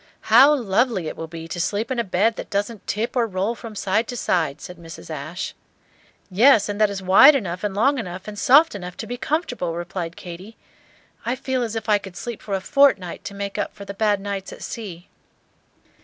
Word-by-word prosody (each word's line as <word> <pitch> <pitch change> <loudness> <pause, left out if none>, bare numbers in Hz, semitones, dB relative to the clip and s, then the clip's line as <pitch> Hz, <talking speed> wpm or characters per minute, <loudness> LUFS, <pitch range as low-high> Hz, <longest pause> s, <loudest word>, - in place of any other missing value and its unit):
"How 275 +6 +8
lovely 225 - 0
it - - -5
will 165 - -6
be 165 0 -8
to 175 +1 -5
sleep 210 +6 -1
in 255 - -1
a - - +2
bed 210 +3 +1
that - - -7
doesn't 205 +2 -3
tip 220 +5 -2
or 240 -2 +2
roll 195 +3 -1
from 230 -2 -10
side 205 +3 0
to 245 - -5
side!" 160 -8 0
said 180 - -9
Mrs. 165 -1 -11
Ashe. 155 +4 -5 0.8
"Yes, 225 +2 +5
and 205 +1 -3
that 210 - +5
is 195 -1 -5
wide 230 +11 +8
enough 185 -7 -3
and 205 -2 -2
long 270 +6 +2
enough 185 -3 -7
and 205 -1 -6
soft 295 +6 +6
enough 180 -3 -7
to - - -5
be 245 - -5
comfortable!" 245 - -2
replied 175 -1 -5
Katy. 185 +5 -10 0.7
"I 240 - -1
feel 260 -1 -2
as 230 -2 -3
if 225 - -4
I 210 -1 +4
could 195 -2 -11
sleep 240 -3 -6
for 200 - -3
a 190 - -2
fortnight 200 -8 +2
to 200 0 -6
make 200 0 -4
up - - -3
for 200 - -9
the 200 - -6
bad 205 0 +1
nights 195 -1 -5
at - - -10
sea." 185 -6 -7
200 Hz, 215 wpm, -22 LUFS, 180-235 Hz, 0.8 s, How